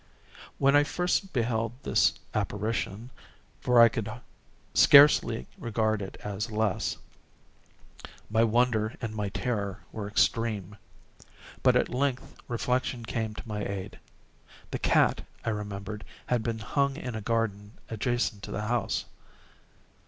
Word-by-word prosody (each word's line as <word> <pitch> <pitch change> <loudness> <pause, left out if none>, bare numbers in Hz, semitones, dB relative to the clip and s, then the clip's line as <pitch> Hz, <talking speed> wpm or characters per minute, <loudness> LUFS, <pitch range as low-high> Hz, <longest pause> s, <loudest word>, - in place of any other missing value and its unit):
When 140 +1 +4
I 145 - +6
first 180 +4 -1
beheld 115 -2 0
this - - +3 0.2
apparition—for 110 +3 -2
I 115 - +10
could 115 -2 -3 0.6
scarcely 140 -5 +7
regard 110 -2 0
it 95 - -7
as 105 +3 -3
less—my 110 +1 -4
wonder 115 -1 +2
and 115 -3 -4
my 105 -2 -2
terror 100 -3 -3
were 105 -2 -5
extreme. 105 -2 0 0.9
But - - +4
at - - +3
length 130 0 -2
reflection 125 0 -1
came 110 -1 -3
to 105 - -9
my 105 -1 -3
aid. 100 0 -5 0.7
The - - -2
cat, - - +3 0.2
I 110 - +1
remembered, 105 0 -5 0.2
had 125 -2 +1
been 115 0 -2
hung 140 +5 0
in 125 -6 -5
a 110 - -4
garden 105 -2 -1
adjacent 115 -1 -1
to - - -7
the 105 - -3
house. 115 -2 -1
110 Hz, 125 wpm, -28 LUFS, 105-120 Hz, 0.9 s, I